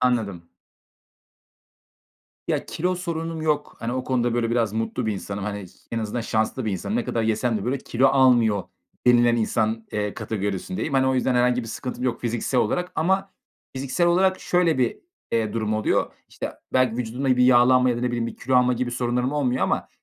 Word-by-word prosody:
Anladım. 105 -9 0 2.0
Ya, - - -1
kilo 180 +3 -1
sorunum 165 -2 -4
yok. 150 -2 -1
Hani, 115 +1 -3
o 130 0 -2
konuda, 120 -2 0
böyle, 115 -1 0
biraz 115 -3 +1
mutlu 110 0 -2
bir 110 - +1
insanım. 100 0 -5
Hani, 100 -3 -5
ş 95 - -22 0.2
en 115 - 0
azından 110 +2 -3
şanslı 110 +3 -1
bir 110 - -1
insanım. 200 - -2
"Ne 240 - 0
kadar 115 - -1
yesem 110 +1 +1
de 100 - -6
böyle 130 +3 -1
kilo 130 +1 +1
almıyor" 120 -7 +4 0.4
denilen 120 -1 +5
insan, 110 0 0
eee, 105 -1 -2
kategorisindeyim. 105 - -3
Hani, 130 0 +3
o 130 - +2
yüzden 130 0 +1
herhangi 125 0 +2
bir 115 - -8
sıkıntım 125 +1 -5
yok 120 -2 -1
fiziksel 120 +2 0
olarak 180 +1 -1
ama 190 +4 +1 0.5
fiziksel 140 +6 0
olarak 185 +2 +3
şöyle 175 -4 +2
bir, 125 -2 +1 0.3
eee, 110 -2 0
durum 110 -1 -1
oluyor. 110 - 0 0.2
İşte, - - -6 0.2
belki 130 -3 +2
vücudumda 125 +2 0
bir 125 - +4
yağlanma 125 0 +5
ya 120 - -1
da, - - -3
ne 125 - 0
bileyim, 120 -1 -1
bir - - -7
kilo 130 +1 +1
alma 125 0 +4
gibi 125 0 -2
sorunlarım 125 +2 -1
olmuyor 130 -4 0
ama - - 0
125 Hz, 190 wpm, -24 LUFS, 110-130 Hz, 2.0 s, denilen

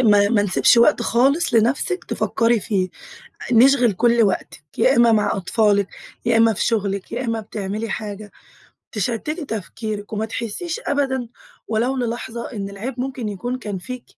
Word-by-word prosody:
ما 205 -4 +5
ما 205 -2 +3
نسيبش 200 +3 +4
وقت 235 +2 +4
خالص 270 +6 +2
لنفسِك 255 - +1
تفكري 230 0 +1
فيه. 190 -3 -1 0.6
نشغل 245 0 +5
كل 235 +4 +3
وقتك. 205 - -1 0.2
يا - - +4
إما 235 -1 +5
مع 215 -1 +2
أطفالك، 200 +1 +2 0.4
يا 235 -1 +3
إما 225 0 +5
في - - -2
شغلك، 200 -3 -1
يا 250 +2 -3
إما 230 -1 -1
بتعملي 210 +1 -5
حاجة، 210 0 -6 0.6
تشتتى 230 - -2
تفكيرك، 215 -1 -5
وما 215 +1 -1
تحسيش 235 - -4
أبدًا 265 -3 0 0.4
ولو 235 +4 0
للحظة 235 -1 -4
إن 200 -3 -4
العيب 235 +6 -6
ممكن 255 -4 -3
يكون 240 +6 -4
كان 205 -5 -5
فيكِ، 250 +7 -7
225 Hz, 150 wpm, -21 LUFS, 205-245 Hz, 0.6 s, ما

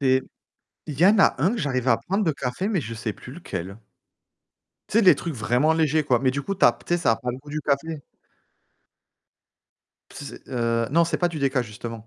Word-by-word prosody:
Il 130 -1 +3 0.7
y 155 +3 +1
en 210 +2 +5
a 195 - +5
un 185 - +4
que 240 - -3
j'arrive 130 -4 -1
à 115 - +4
prendre 195 +3 -1
de 160 - +1
café, 135 +9 -3
mais 195 -7 0
je 115 -3 -7
ne - - -6
sais 110 -2 -3
plus 125 - -12
lequel 100 - -6 1.1
tu 220 - +2
sais? 230 - +4
Les 185 - +8
trucs 165 -2 -5
vraiment 125 +6 +2
légers, 160 -1 +1
quoi, 125 -4 +2
mais 130 0 +1
du 140 +1 -3
coup, 195 - -3
tu 190 - +1
as, - - +7
tu 175 - -3
sais, - - +1
ça 165 -9 +2
a - - -1
pas 125 - -4
le 125 - -7
goût 145 +2 -13
du 150 +1 -3
café. 145 +1 -2 2.1
S 145 - -8 0.2
heu, 115 -2 0
non, 170 +3 +4
ce 165 - -5
n'est - - -11
pas 175 - +3
du 165 -2 -6
déca, 135 -2 +1
justement. 115 0 -8
140 Hz, 235 wpm, -24 LUFS, 120-165 Hz, 2.1 s, Les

